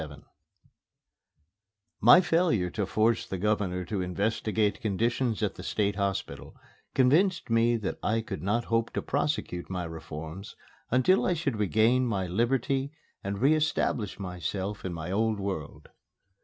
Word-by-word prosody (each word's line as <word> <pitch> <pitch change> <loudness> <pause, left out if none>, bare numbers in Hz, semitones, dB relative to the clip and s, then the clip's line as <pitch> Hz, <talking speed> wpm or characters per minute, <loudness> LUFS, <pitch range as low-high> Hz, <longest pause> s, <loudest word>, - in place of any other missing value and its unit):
XXVII 75 -2 -9 1.8
My 120 - +8
failure 165 - +1
to 100 0 -2
force 110 +3 +1
the 95 - -4
Governor 95 -2 0
to 100 +1 -2
investigate 105 +3 0
conditions 115 +2 0
at 105 - 0
the - - -10
State 100 +1 -1
Hospital 100 -1 -3 0.4
convinced 155 +4 +3
me 115 +1 +3
that 105 -4 -4
I 115 +2 +1
could 110 - -6
not 110 +5 0
hope 115 0 0
to - - -2
prosecute 140 - -2
my 90 -2 -3
reforms 80 +2 -8 0.3
until 130 +11 +3
I 180 - +1
should 140 -9 -2
regain 110 +5 +3
my 100 -5 -1
liberty 130 +8 0 0.3
and 100 0 -3
re 140 +6 +4
establish 150 -8 0
myself 95 +2 -4
in 95 - -3
my 85 +1 -5
old 110 +1 +1
world. 95 -7 -5
105 Hz, 140 wpm, -28 LUFS, 95-120 Hz, 1.8 s, My